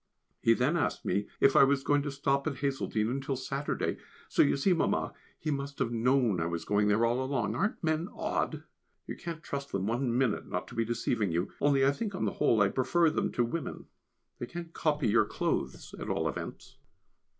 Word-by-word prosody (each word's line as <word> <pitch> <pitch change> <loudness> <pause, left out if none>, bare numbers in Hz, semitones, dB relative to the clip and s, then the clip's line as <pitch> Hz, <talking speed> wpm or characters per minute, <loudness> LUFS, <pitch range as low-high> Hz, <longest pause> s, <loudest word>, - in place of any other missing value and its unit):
He 115 - +5
then 140 +9 +2
asked 155 - -1
me 100 0 0
if 135 - +5
I - - +8
was 135 0 +3
going 145 0 +3
to 145 - -3
stop 140 +1 0
at 145 - -1
Hazeldene 130 -5 -1
until 135 +1 -2
Saturday. 135 +2 -2 0.3
So - - +3
you 140 - +4
see, 180 +7 +3
Mamma, 165 - 0 0.2
he 155 - -2
must 140 0 -3
have 125 -3 0
known 120 -4 +2
I 85 - 0
was 85 -1 -3
going 105 0 +2
there 105 +3 +3
all 120 +2 +1
along; 130 -2 -1
aren't 205 0 -1
men 160 +3 0
odd? - - -2 0.4
You - - -5
can't 170 -2 -7
trust 140 -1 -5
them 95 -1 -1
one 120 +2 0
minute 125 -5 +1
not - - -3
to - - -11
be 115 - 0
deceiving 115 -3 0
you, 85 +2 -1
only 140 -2 +4
I 140 - +5
think 200 +6 -4
on - - -1
the - - 0
whole 110 - +4
I 100 - +3
prefer 160 +7 +2
them - - -1
to 120 - +2
women, 135 +5 -4 0.5
they 120 - -4
can't 170 +1 -7
copy 150 -5 +1
your 110 +1 +4
clothes - - -2
at - - -5
all - - 0
events. - - -6
135 Hz, 210 wpm, -30 LUFS, 115-145 Hz, 0.5 s, I